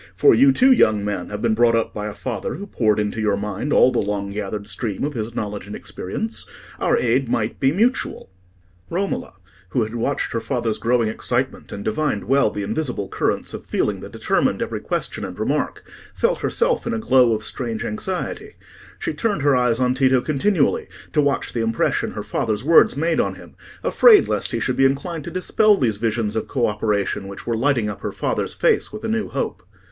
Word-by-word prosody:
For 415 - +6
you, 275 +2 +6
too, 260 0 +4
young 110 - +4
man, 100 -4 -3
have 105 +1 -5
been 115 -2 +3
brought 115 +1 +4
up 115 - 0
by 105 0 -4
a 105 - -6
father 120 -6 -4
who 200 - -7
poured 110 - +1
into 105 +1 -2
your 105 -2 +1
mind 105 +7 -3
all 130 - +5
the - - 0
long 100 -1 -2
gathered 100 0 -4
stream 105 -1 -4
of 145 +1 -1
his 115 -1 -4
knowledge 105 -2 -4
and 105 - -6
experience. 110 +4 -4 0.3
Our - - +2
aid 125 +1 +1
might 110 -1 -1
be 135 - +3
mutual." 220 - 0 0.6
Romola, 190 - -3 0.3
who 115 +6 +1
had 110 +1 -5
watched 120 +4 -1
her 115 - 0
father's 115 -1 -2
growing 120 -1 +2
excitement, 110 - -2
and 100 - -6
divined 110 -1 -1
well 135 -3 +3
the 105 -1 -4
invisible 120 -4 -2
currents - - -1
of - - -6
feeling - - -1
that - - -9
determined - - 0
every - - -3
question - - -3
and 95 -2 -6
remark, 135 +8 -2 0.3
felt - - +1
herself 480 - 0
in 230 - -1
a - - -1
glow 130 - +4
of 105 - -5
strange 115 -1 -4
anxiety: 190 - -4 0.4
she - - -3
turned 205 -10 -1
her 145 -2 +4
eyes 125 -2 +2
on 125 0 +2
Tito 130 -1 +3
continually, 155 +4 +1 0.3
to 150 - +4
watch 140 -1 0
the 115 - -1
impression 115 0 0
her - - -5
father's 110 -1 -2
words 160 -3 +5
made 165 +2 +1
on - - 0
him, - - -14 0.3
afraid 455 -4 +6
lest - - 0
he - - -1
should - - -1
be - - +4
inclined 140 +3 -1
to - - -4
dispel 205 +3 +3
these 110 - 0
visions 110 -1 -1
of 110 - -2
co 125 -4 0
operation 105 -2 -1
which 100 - -9
were 115 - -1
lighting 120 -2 +1
up 105 - -6
her - - -3
father's - - -2
face - - +2
with 215 - -8
a - - -2
new 220 -1 -1
hope. - - -3
120 Hz, 205 wpm, -21 LUFS, 105-150 Hz, 0.6 s, For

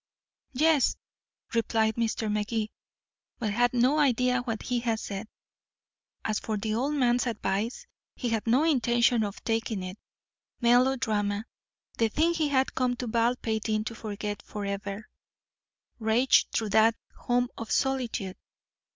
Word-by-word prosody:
"Yes," 305 0 +3 0.6
replied 225 -1 +2
Mr. 225 -2 -1
Magee, 210 +1 -1 0.7
but 215 -4 -2
had 245 +2 +3
no 250 +5 +3
idea 250 -3 +3
what 225 -3 -4
he 245 -1 0
had 230 -2 -1
said. 200 +1 -5 1.0
As 215 -1 0
for 215 -1 -3
the 215 +1 -2
old 270 +7 0
man's 245 -2 +2
advice, 225 - -2 0.3
he 245 - -2
had 225 0 -1
no 250 +6 +4
intention 240 -6 +3
of 205 -1 -5
taking 225 -3 -1
it. 185 +3 -7 0.6
Melodrama 235 -4 +2 0.5
the 225 -1 +3
thing 320 +8 +2
he 320 -3 +1
had 265 -1 +1
come 250 -1 +1
to 250 - -4
Baldpate 230 -1 0
Inn 215 0 +1
to 225 - -5
forget 210 -2 -5
forever 200 0 -5 0.9
raged 225 +4 +3
through 220 -2 -1
that 220 +2 +5 0.2
home 245 0 0
of 225 - -7
solitude. 245 -8 -1
230 Hz, 135 wpm, -28 LUFS, 215-250 Hz, 1.0 s, that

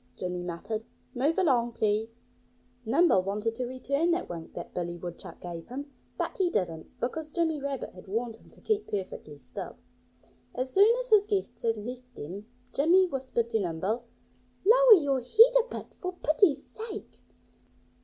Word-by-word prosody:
Jimmy 180 -1 -3
muttered. 180 +6 -4 0.3
"Move 280 +6 +1
along, 250 -10 +2
please!" 220 +1 0 0.7
Nimble 275 - +4
wanted 210 +4 -2
to 250 +1 -3
return 280 +6 0
that 345 +1 +1
wink 165 -2 -8
that 175 - -7
Billy 175 -1 -3
Woodchuck 175 0 -8
gave 170 -2 -7
him. 280 +3 -7 0.3
But - - -2
he 375 -2 +2
didn't, 165 - -3
because 305 +6 -3
Jimmy 320 -2 0
Rabbit 275 -2 -3
had 180 - -13
warned 225 +3 -2
him - - -20
to - - -19
keep 430 -1 0
perfectly 185 -7 -5
still. 125 -3 -8 0.8
As 255 +1 -2
soon 405 +3 +7
as - - -9
his 415 -1 +6
guests 400 -2 -2
had 225 -1 +1
left 250 +3 -8
them 195 +8 -7 0.3
Jimmy 345 +7 +5
whispered 260 -7 -2
to 225 - +2
Nimble, 195 +6 -2 0.6
"Lower - - +8
your 280 -3 +1
head 455 - +6
a - - -15
bit, - - -7
for 365 0 -3
pity's 305 -3 +2
sake!" 440 -1 -8
250 Hz, 165 wpm, -29 LUFS, 200-335 Hz, 0.8 s, Lower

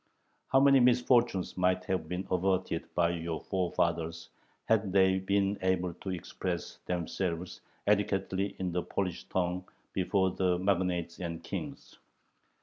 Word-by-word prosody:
How 135 - +4
many 135 0 +6
misfortunes 120 -5 +3
might 90 0 +2
have 95 -4 -1
been 90 +2 -3
averted 90 -2 0
by 85 -1 +3
your 85 -1 -3
forefathers, 85 -3 -1 0.4
had 110 -3 +2
they 95 0 +4
been 100 +1 +1
able 90 -1 +1
to 95 - -8
express 90 0 -4
themselves 90 0 -3 0.2
adequately 100 -1 +1
in 90 -1 -2
the 90 +1 0
Polish 90 -1 -3
tongue 90 0 -2 0.2
before 95 0 +1
the 90 -1 +1
magnates 90 -2 0
and 85 -2 -5
kings! - - -7
95 Hz, 130 wpm, -31 LUFS, 85-95 Hz, 0.4 s, many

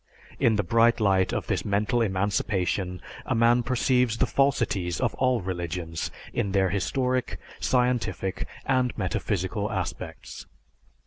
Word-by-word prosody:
In 115 -2 +4
the 105 - +1
bright 115 +6 +3
light 95 -3 +3
of - - -2
this - - -1
mental 105 +4 +1
emancipation 95 -2 0 0.2
a - - -1
man 120 +1 +4
perceives 125 -1 +1
the - - +3
falsities 100 - +1
of - - 0
all 130 -3 +1
religions 85 -2 -4 0.2
in 100 -2 -1
their 95 -2 +2
historic, 125 +5 -1 0.2
scientific, 125 -7 0 0.2
and 130 -2 +1
metaphysical 100 +1 -2
aspects. 95 -5 -5
105 Hz, 125 wpm, -26 LUFS, 95-125 Hz, 0.2 s, In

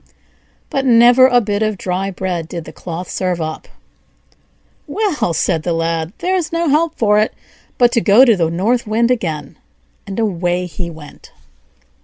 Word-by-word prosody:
But 270 - 0
never 245 +1 +6
a 245 -1 +4
bit 205 -1 -2
of 215 -2 0
dry 185 +2 -2
bread 180 -3 -4
did 170 -1 -7
the 155 - -11
cloth 175 +2 -7
serve 180 -2 -2
up. 155 -1 -5 1.2
"Well," 395 - -1
said 160 0 0
the 170 +1 -2
Lad 165 0 -2
"there's 365 -2 -1
no 335 -1 0
help 310 +3 +1
for 210 -2 +3
it 215 - 0 0.4
but 240 -1 +4
to 235 -2 +1
go 220 +6 +6
to 230 -4 +4
the 165 -4 0
North 215 +8 0
Wind 230 +3 +1
again;" 160 - -3 0.5
and 195 +2 -5
away 180 -4 -1
he 175 +1 -6
went. 155 -3 -13
195 Hz, 165 wpm, -17 LUFS, 170-240 Hz, 1.2 s, never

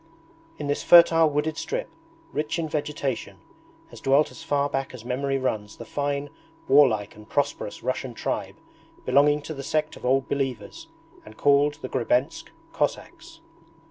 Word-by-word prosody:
In 150 - -5
this 145 0 -1
fertile 165 -2 +7
wooded 150 +2 -1
strip, - - -3 0.5
rich 150 +2 -2
in 165 -1 -2
vegetation, 145 -4 -3 0.5
has - - -12
dwelt 140 +3 +3
as - - -12
far 145 -3 0
back 135 -2 -3
as 120 -2 -11
memory 135 +2 -1
runs 110 -5 -3
the 115 - -9
fine 145 +3 -3 0.4
warlike 125 -7 +4
and 105 0 -15
prosperous 145 -7 -2
Russian 130 -1 -3
tribe - - -3 0.5
belonging 145 +3 +3
to 160 - -6
the 140 - -7
sect 155 +2 -1
of - - -14
Old 135 +1 +2
Believers, 135 - -4 0.4
and - - -14
called 145 +1 +3
the - - -2
Grebensk 125 +3 0 0.3
Cossacks. 330 -1 -4
140 Hz, 150 wpm, -25 LUFS, 130-150 Hz, 0.5 s, fertile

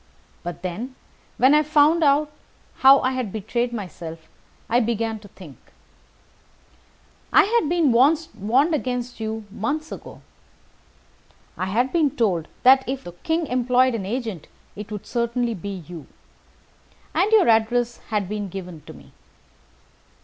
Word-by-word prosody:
But 175 +1 -7
then, 225 +9 -5 0.4
when 260 +3 +5
I 300 - +6
found 305 +2 +3
how 280 -2 +2
I 255 - +1
had 255 -6 -3
betrayed 235 +4 -2
myself, 170 -7 -7 0.4
I 240 - +3
began 225 -1 -1
to 205 - -14
think. 170 -8 -14 1.7
I - - +7
had 440 -7 +1
been 335 -5 +3
warned 280 - +2
against 250 -4 -3
you 220 0 -4
months 295 +9 -3
ago. - - -10 1.3
I 185 - -3
had 245 +7 0
been 320 -4 +3
told 190 - 0 0.2
that, 265 +1 +7
if 265 0 -3
the 175 - -8
King 320 - -2
employed 255 0 +2
an 200 -5 -3
agent, 220 - -4 0.3
it 210 +1 -8
would 210 -2 -6
certainly 235 0 -1
be 195 -2 -6
you. 170 -4 -9 1.1
And 370 +7 +2
your 435 -4 +5
address 235 +1 +2
had 210 -4 -1
been 205 0 -4
given 180 -4 -8
me. - - -15
235 Hz, 135 wpm, -23 LUFS, 205-275 Hz, 1.7 s, I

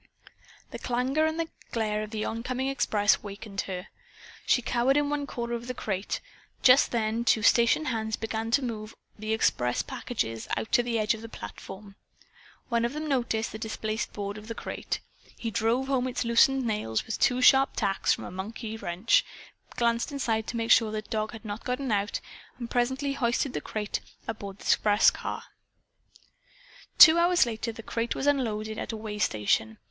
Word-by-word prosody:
The - - -6
clangor 260 +6 +1
and 325 +1 -2 0.2
glare 215 -3 -1
of 215 - -5
the 215 -1 -3
oncoming 255 +3 -2
express 210 -6 +2
awakened 200 -1 -6
her. 180 -1 -5 0.6
She 250 - +3
cowered 245 +4 +2
in 290 0 +1
one 290 -1 -2
corner 235 -2 -4
of 235 0 -4
the 250 - -4
crate. 195 -3 -3 0.4
Just 255 +2 +7
then 225 0 0
two 220 -2 +3
station 235 +8 +4
hands 220 -5 -1
began 225 0 -3
to 260 +4 +2
move 215 -2 -5 0.2
the 215 +1 -3
express 125 - +1
packages 225 - -4
out - - -4
to - - +5
the 240 -1 -1
edge 215 0 +2
of 220 - -7
the 230 - -8
platform. 195 - -10 0.7
One 235 -2 +1
of 240 +3 -1
them 305 +1 -4
noticed 235 -5 0
the 220 - -7
displaced 220 0 -3
board 205 0 -5
of 210 - -13
the 230 - -5
crate. - - -4 0.4
He 230 - -4
drove 230 +5 +1
home 265 -2 0
its 250 -1 -2
loosened 255 +3 +4
nails 210 - -1
with 225 - -4
two 250 -1 +3
sharp 270 +1 +6
taps 195 -3 +1
from - - 0
a - - -7
monkey 215 +4 -6
wrench, 180 +2 +2 0.5
glanced 235 +2 +1
inside 230 -6 -1
to 235 - -3
make 230 0 -1
certain 220 -2 +5
the 215 0 -3
dog 215 0 -2
had 225 0 -10
not 205 +1 -5
gotten 250 0 -2
out, 205 0 0 0.4
and 235 -2 -7
presently 265 +3 0
hoisted 255 +1 0
the - - -3
crate 210 -1 -3 0.3
aboard 200 -3 -6
the - - -14
express 205 -1 +4
car. - - -5 1.5
Two 340 -1 +10
hours 350 -3 +4
later 230 0 -3
the 225 0 -10
crate 230 +1 -2
was - - -3
unloaded 220 -6 0
at - - -4
a 225 - -5
waystation. 110 - 0
225 Hz, 180 wpm, -28 LUFS, 215-250 Hz, 1.5 s, Two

